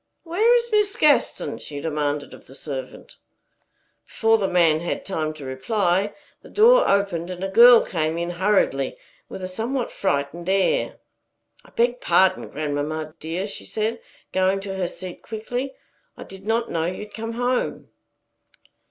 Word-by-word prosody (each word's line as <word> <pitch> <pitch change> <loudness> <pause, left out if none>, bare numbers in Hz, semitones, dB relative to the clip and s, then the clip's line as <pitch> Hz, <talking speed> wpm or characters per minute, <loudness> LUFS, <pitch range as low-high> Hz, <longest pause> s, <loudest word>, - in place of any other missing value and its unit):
"Where 425 +8 +3
is 475 0 0
Miss 420 -2 +2
Gaston?" 300 -2 +2
she 145 -1 -6
demanded 150 -1 -2
of - - -14
the 135 - -13
servant. 135 -3 -7 0.9
Before 225 0 +2
the 195 - +1
man 165 -4 +3
had 170 - -4
time 160 -5 -2
to 145 -3 -9
reply, 190 - 0 0.3
the - - -15
door 485 +4 +5
opened, 195 -4 +1
and 180 0 -6
a - - 0
girl 235 +4 +7
came 160 -2 -1
in 170 +1 -2
hurriedly, 210 - +1 0.3
with 190 - -7
a - - -2
somewhat 230 +7 -3
frightened 170 +1 -2
air. 195 - +1 0.7
"I - - -18
beg 240 +1 0
pardon, 185 +2 +3
grandmamma 155 +1 -3
dear," 165 +5 -3
she 205 - -7
said, 220 +2 -2 0.3
going 190 +1 +2
to 195 -1 -5
her 190 -2 -1
seat 180 0 -8
quickly. 245 +5 -5 0.4
"I - - -8
did 195 +1 -12
not 230 +1 0
know 165 -1 0
you 185 +4 -4
had 210 0 -13
come 225 +1 -5
home." 245 +1 -1
190 Hz, 160 wpm, -23 LUFS, 165-230 Hz, 0.9 s, girl